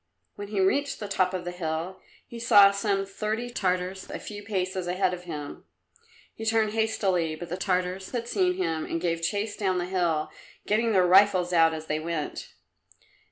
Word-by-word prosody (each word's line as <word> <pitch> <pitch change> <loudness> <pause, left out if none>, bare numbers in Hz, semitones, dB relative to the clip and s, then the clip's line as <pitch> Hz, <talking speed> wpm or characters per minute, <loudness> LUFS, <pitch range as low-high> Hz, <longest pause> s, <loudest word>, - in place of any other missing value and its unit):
When 205 - -7
he 205 -1 -3
reached 280 +10 +1
the 210 - -5
top 185 -2 +1
of 185 -1 -4
the 175 - -3
hill 170 +1 -4 0.3
he 235 - -9
saw 205 -3 +7
some 200 -1 0
thirty 215 +4 -3
Tartars 185 -3 -2
a - - -4
few 205 -1 -8
paces 185 -3 -2
ahead 185 +1 +1
of 180 0 -7
him. 150 -4 -7 0.7
He 225 - -8
turned 220 -1 +2
hastily, 195 -7 0
but 170 +2 -8
the 175 - -2
Tartars 185 0 -1
had 235 -2 -4
seen 365 +5 +1
him 160 - -1
and 165 - -3
gave 165 -1 -1
chase 205 +5 -1
down 190 -3 0
the 175 - -1
hill, 175 -4 0 0.3
getting 225 +2 +1
their 185 -2 +4
rifles 185 -1 +5
out 165 -1 +5
as 155 0 -7
they 155 0 -1
went. 160 -2 -4
185 Hz, 185 wpm, -27 LUFS, 175-210 Hz, 0.7 s, saw